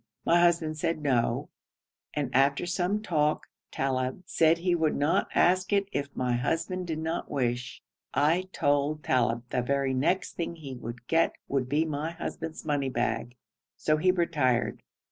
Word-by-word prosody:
My 170 +1 +5
husband 165 -3 +2
said 165 +1 0
'No,' 125 -5 +1 0.7
and 145 -4 -2
after 140 +5 +3
some 185 +4 -1
talk 150 -6 +1 0.2
Talib 130 +4 -2
said 165 -2 +3
he 175 +1 +1
would 160 -3 +1
not 145 +3 +1
ask 185 +2 +3
it 200 -1 +3
if 140 0 -2
my 125 -1 0
husband 165 +8 -1
did 160 -2 -2
not 160 +1 -3
wish. 125 -2 -2 0.3
I 170 +6 +2
told 145 0 +1
Talib 120 -2 +1
that - - -1
the - - -4
very 140 +1 0
next 155 +9 0
thing 170 0 -4
he 145 -5 -8
would 120 -1 -8
get 165 +5 +2
would 130 -2 -1
be 150 +3 +2
my 155 +1 -3
husband's 165 -2 -6
money 145 -3 0
bag, 120 -1 -2 0.4
so 155 0 +2
he 185 +4 +2
retired. 155 -9 +1
150 Hz, 165 wpm, -28 LUFS, 130-170 Hz, 0.7 s, My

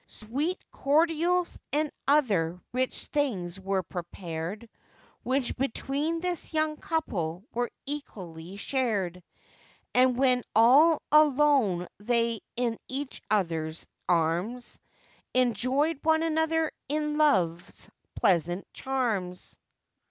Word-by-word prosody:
Sweet 280 - -3
cordials 330 +4 +1
and 300 +1 +1 0.2
other 200 - +2
rich 255 +1 -1
things 195 - -1
were 190 0 -1
prepared, 175 +4 -6 0.5
Which 260 0 -1
between 280 +5 -1
this 350 -2 -3
young 310 0 +2
couple 185 - -2
were 245 0 -1 0.2
equally 190 - -6
shared; 200 -7 -1 0.7
And 250 0 +4
when 255 -2 +3
all 280 +8 +6
alone 285 - +4
they 230 +1 +1 0.2
in 235 -2 -1
each 275 +1 -5
other's 165 -6 -1 0.2
arms, 175 +9 0 0.6
Enjoyed 255 +5 +2
one 320 0 +3
another 320 0 +1 0.2
in 300 0 -1
love's 175 - +1 0.3
pleasant 175 0 +2
charms. 220 -9 -2
250 Hz, 95 wpm, -28 LUFS, 185-295 Hz, 0.7 s, all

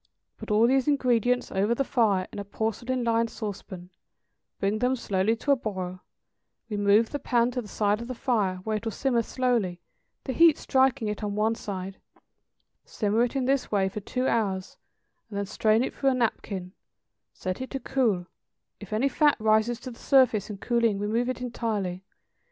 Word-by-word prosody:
Put - - -8
all 215 +2 +4
these 265 +2 +2
ingredients 250 -4 +2
over 205 +5 +1
the 275 - +1
fire 215 -9 +1
in - - -5
a - - -3
porcelain 225 +5 -2
lined 230 0 +1
sauce 210 -4 -5
pan, 180 -2 -11 0.7
bring 200 +2 0
them 250 +2 +2
slowly 200 -2 0
to 280 +5 -1
a - - +6
boil, 190 -7 -5 0.7
remove 205 +1 +3
the 290 - -3
pan 240 -2 +1
to 250 - -2
the 215 - -11
side 210 +1 0
of 235 - -6
the 255 - -5
fire, 215 -7 0
where 215 +1 -1
it 210 - -8
will 225 - -2
simmer 245 0 +1
slowly, 230 -8 0 0.4
the 260 - -3
heat 330 +1 +6
striking 260 -4 +2
it 210 +1 -4
on 205 -1 -2
one 215 +2 +2
side; 195 -3 -6 0.9
simmer 215 +2 0
it 245 - -6
in 265 -2 0
this 270 0 0
way 195 -2 +2
for 205 - -5
two 255 +5 -2
hours, 195 -4 -1 0.5
and 205 - -6
then 200 - -1
strain 215 +3 +2
it - - -3
through 275 - +1
a 260 - +1
napkin, 195 -6 -2 0.6
set 185 +5 -5
it 260 - -5
to 270 - -4
cool; 230 -11 0 0.5
if 205 -1 -11
any 220 +6 +2
fat 295 +1 +3
rises 220 +2 +2
to 255 - -7
the 230 - -13
surface 255 -7 +3
in 205 - -6
cooling 230 -1 +1
remove 220 +5 0
it 255 - -3
entirely. 210 -7 -3
225 Hz, 190 wpm, -27 LUFS, 205-250 Hz, 0.9 s, a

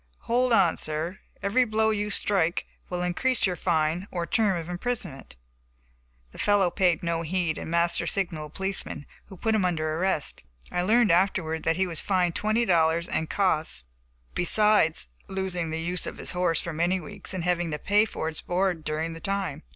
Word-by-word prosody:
"Hold 250 +1 +1
on, 190 -7 +4
sir, 155 +4 -2 0.2
every 220 +6 +3
blow 220 -1 +2
you 210 -1 -1
strike 195 -4 +2 0.2
will 180 0 -2
increase 230 +8 +1
your 185 -2 0
fine 170 +1 0
or 175 -2 -3
term 200 -1 +2
of 165 -1 -5
imprisonment." 180 - -4 1.0
The - - -13
fellow 200 -3 +3
paid 175 -2 +2
no 170 -1 0
heed, 170 -1 -1
and - - -6
Master 170 +1 +1
signaled 160 -6 -2
a - - -29
policeman, 195 -6 -4 0.2
who 190 - -12
put 225 +5 0
him 215 -3 +2
under 155 -3 0
arrest. 170 -2 -1 0.3
I 180 - 0
learned 215 +2 +4
afterward 170 -3 +1
that 165 - +2
he 190 +2 +1
was 170 -3 0
fined 180 -3 +1
twenty 215 +5 +1
dollars 170 -2 +2
and 160 - -2
costs, 170 - +1 0.5
besides 175 - +3 0.2
losing 185 -3 -2
the 160 +1 -3
use 175 +2 -1
of - - -6
his - - -3
horse 180 -3 +1
for 170 - -5
many 175 +4 +1
weeks 185 +4 -6
and 180 - -3
having 175 -1 0
to 150 - -2
pay 205 +7 +3
for 180 - -4
its 160 -1 -1
board 180 -2 0
during 155 +2 -2
the 165 - -8
time. 195 -1 -2
180 Hz, 185 wpm, -26 LUFS, 165-200 Hz, 1.0 s, on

